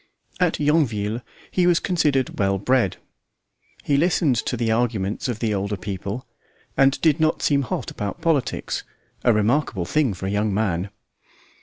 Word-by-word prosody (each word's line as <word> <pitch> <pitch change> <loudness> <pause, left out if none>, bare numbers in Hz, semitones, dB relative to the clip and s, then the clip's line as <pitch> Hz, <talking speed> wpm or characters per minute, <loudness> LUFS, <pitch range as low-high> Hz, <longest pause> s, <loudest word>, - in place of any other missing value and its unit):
At 180 -2 +1
Yonville 120 -8 +1 0.3
he 180 -1 +2
was 175 -1 +4
considered 150 -8 0
"well 95 -1 +2
bred." 120 -1 +1 0.9
He 140 - +2
listened 160 -3 +2
to 125 - -1
the 115 -1 0
arguments 110 -3 0
of 120 -4 -2
the 110 -2 -1
older 100 +1 -2
people, 100 +5 -5 0.5
and 135 0 +4
did 160 -1 +3
not 155 0 +1
seem 140 -1 +3
hot 125 - -3
about 105 +9 -4
politics 160 -5 0 0.4
a 120 - +5
remarkable 105 - +1
thing 130 - +1
for 95 - -6
a 95 - -1
young 105 +1 +1
man. 100 -3 0
120 Hz, 155 wpm, -23 LUFS, 100-145 Hz, 0.9 s, a